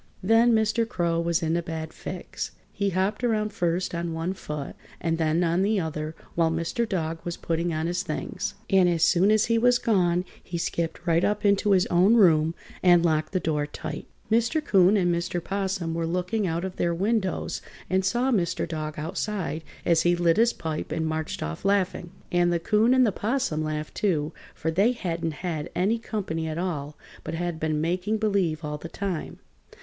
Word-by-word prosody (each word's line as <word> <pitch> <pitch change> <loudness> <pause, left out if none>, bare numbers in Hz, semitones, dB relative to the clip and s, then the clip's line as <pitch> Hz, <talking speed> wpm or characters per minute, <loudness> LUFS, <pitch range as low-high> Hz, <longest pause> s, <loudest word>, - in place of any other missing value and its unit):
Then 225 +4 +5
Mr. 220 +1 +2
Crow 170 -6 0
was 170 +1 0
in 160 +1 +1
a 170 - +1
bad 160 -1 -5
fix. 180 -1 -6 0.2
He 200 -1 0
hopped 195 +5 -1
around 215 -3 +1
first 175 -3 -1
on 170 -1 -2
one 165 +3 -2
foot 150 -6 -6 0.2
and 165 -1 -1
then 160 +2 +2
on 170 +2 +2
the 205 +1 +2
other 155 -2 -4 0.2
while 165 -1 +2
Mr. 170 +8 -1
Dog 165 -4 -2
was 170 -1 -4
putting 170 +1 -1
on 155 0 -1
his 175 +2 -1
things, - - -4
and 190 -3 +4
as 170 -2 +1
soon 185 +3 +4
as 215 0 +4
he 230 0 +2
was 245 +1 +4
gone 180 -6 +2 0.2
he 170 - -5
skipped 165 0 -3
right 170 0 +3
up 210 0 0
into 200 0 +4
his 185 -1 +4
own 185 +6 +5
room 165 -6 +5 0.3
and 175 -1 +5
locked 155 -2 +1
the 185 - +1
door 150 -3 -1
tight. - - -6 0.2
Mr. 235 +8 +2
'Coon 195 -1 +5
and 175 -3 +2
Mr. 170 +1 -1
'Possum 190 -4 -2
were 165 0 -1
looking 180 +4 -1
out 170 +2 -1
of 190 0 -6
their 170 -1 +1
windows 195 +1 -1 0.3
and 190 0 +1
saw 240 +7 +1
Mr. 180 -7 0
Dog 155 -2 -4
outside 165 +1 -3 0.2
as 170 -1 +4
he 175 0 +3
lit 170 -1 +2
his 230 +1 +5
pipe 160 -2 -4
and 160 - -1
marched 160 0 -3
off 75 +1 -5
laughing. 190 -3 +1 0.2
And 175 0 +3
the 170 - +2
'Coon 215 +8 +3
and 255 -1 +5
'Possum 210 - -1
laughed, 155 0 -3
too, 160 -6 0 0.2
for 160 - -2
they 200 +9 +3
hadn't 170 -5 -3
had 155 -4 -3
any 210 +6 +1
company 190 -8 -3
at 155 0 -4
all, 155 -5 -3 0.3
but - - -4
had 175 -1 -3
been 155 -1 0
making 180 +7 0
believe 195 -7 0
all 150 0 -4
the 165 - -8
time. 190 -3 -4
175 Hz, 195 wpm, -26 LUFS, 165-200 Hz, 0.3 s, Then